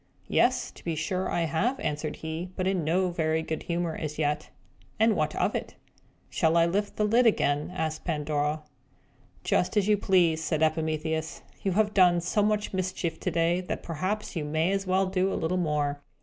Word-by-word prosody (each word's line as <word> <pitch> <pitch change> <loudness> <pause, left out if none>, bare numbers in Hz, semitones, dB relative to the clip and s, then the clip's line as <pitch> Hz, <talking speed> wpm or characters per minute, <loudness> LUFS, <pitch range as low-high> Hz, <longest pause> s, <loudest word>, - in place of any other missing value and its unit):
"Yes, - - +2
to - - -16
be 165 -2 -2
sure 180 +4 -2
I 175 - 0
have," 195 - 0
answered 150 0 -2
he, 160 +3 -5
but 185 - -2
in 190 -3 +1
no 180 +4 +1
very 160 -1 0
good 160 -1 -3
humour 170 -1 -2
as 150 -1 -5
yet. 150 0 -1 0.5
"And 220 -1 +4
what 155 -2 0
of - - +1
it?" - - -4 0.5
"Shall 160 +1 +2
I 165 - +5
lift 200 +4 -1
the 215 - 0
lid 230 +3 +4
again?" 145 -7 +1
asked 160 -4 -3
Pandora. 150 -1 -1 0.8
"Just 180 +4 +1
as 205 -1 +3
you 210 -1 +4
please," 175 -5 +3
said 155 0 0
Epimetheus. 160 0 -1 0.2
"You 195 - 0
have 210 +1 +2
done 180 -3 +5
so 180 +5 0
much 210 0 0
mischief 185 -3 -2
already, 170 +2 +2
that 180 - -5
perhaps 185 +7 -3
you 160 - -1
may 155 +4 0
as 195 -1 -1
well 190 +1 +3
do 190 0 0
a - - -1
little 160 +3 -1
more. 150 -4 0
170 Hz, 190 wpm, -28 LUFS, 155-190 Hz, 0.8 s, I